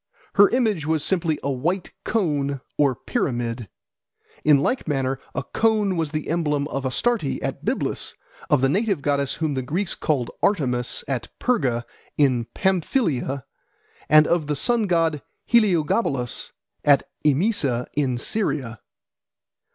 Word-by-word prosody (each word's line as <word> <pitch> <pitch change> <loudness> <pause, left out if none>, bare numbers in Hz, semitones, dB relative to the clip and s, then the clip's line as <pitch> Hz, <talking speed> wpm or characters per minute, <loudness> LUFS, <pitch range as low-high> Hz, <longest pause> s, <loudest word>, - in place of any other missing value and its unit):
Her 200 0 +6
image 215 - 0
was 160 -2 +1
simply 170 -5 +1
a 140 - 0
white 165 +9 -2
cone 145 - 0
or 140 -3 +2
pyramid. 120 - -2 0.7
In 150 -2 +6
like 250 - -1
manner, 135 -3 -1 0.2
a 125 - -1
cone 210 - +1
was 165 -3 -1
the 155 0 -4
emblem 150 -3 0
of 135 -2 -2
Astarte 210 - 0
at - - -4
Byblus, - - -2 0.3
of 145 - +3
the 135 - +4
native 195 0 0
goddess 140 -1 0
whom 155 -3 -1
the 130 - -1
Greeks 170 +9 -2
called 135 -7 -1
Artemis 125 - 0
at 130 -4 -2
Perga 130 - 0 0.3
in 130 -5 +3
Pamphylia, 170 - 0 0.6
and 155 0 +7
of 170 -3 +1
the 150 - 0
sun 230 - +1
god 165 -4 +1 0.2
Heliogabalus 170 - +1 0.3
at 140 -2 +5 0.2
Emesa 145 - +1
in 135 -4 +1
Syria. 125 - -1
150 Hz, 135 wpm, -23 LUFS, 135-185 Hz, 0.7 s, and